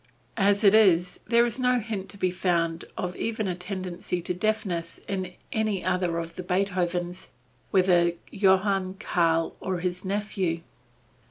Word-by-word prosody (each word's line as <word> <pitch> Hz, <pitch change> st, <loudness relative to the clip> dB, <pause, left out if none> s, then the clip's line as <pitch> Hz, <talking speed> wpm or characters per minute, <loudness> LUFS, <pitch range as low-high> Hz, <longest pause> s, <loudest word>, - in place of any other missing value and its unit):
As 200 Hz, 0 st, +3 dB
it 200 Hz, -1 st, +7 dB
is, 180 Hz, -5 st, +4 dB
there 235 Hz, +1 st, +5 dB
is 240 Hz, +2 st, -3 dB
no 250 Hz, 0 st, +3 dB
hint 210 Hz, -4 st, -5 dB
to 200 Hz, -, -8 dB
be 185 Hz, -2 st, +1 dB
found 170 Hz, -2 st, 0 dB
of 180 Hz, 0 st, -3 dB
even 220 Hz, -2 st, -2 dB
a 185 Hz, -, 0 dB
tendency 180 Hz, -1 st, -4 dB
to 180 Hz, -, -1 dB
deafness 185 Hz, -4 st, -2 dB
in 185 Hz, -2 st, -3 dB, 0.2 s
any 215 Hz, -4 st, 0 dB
other 180 Hz, -2 st, 0 dB
of 165 Hz, 0 st, -5 dB
the -, -, -3 dB
Beethovens, 180 Hz, -1 st, -1 dB, 0.4 s
whether 180 Hz, -3 st, +4 dB, 0.2 s
Johann, 190 Hz, -1 st, +2 dB
Karl, 165 Hz, -4 st, +1 dB
or 185 Hz, -2 st, -2 dB
the 180 Hz, +1 st, -2 dB
nephew. 190 Hz, -4 st, -1 dB
185 Hz, 150 wpm, -26 LUFS, 175-200 Hz, 0.4 s, it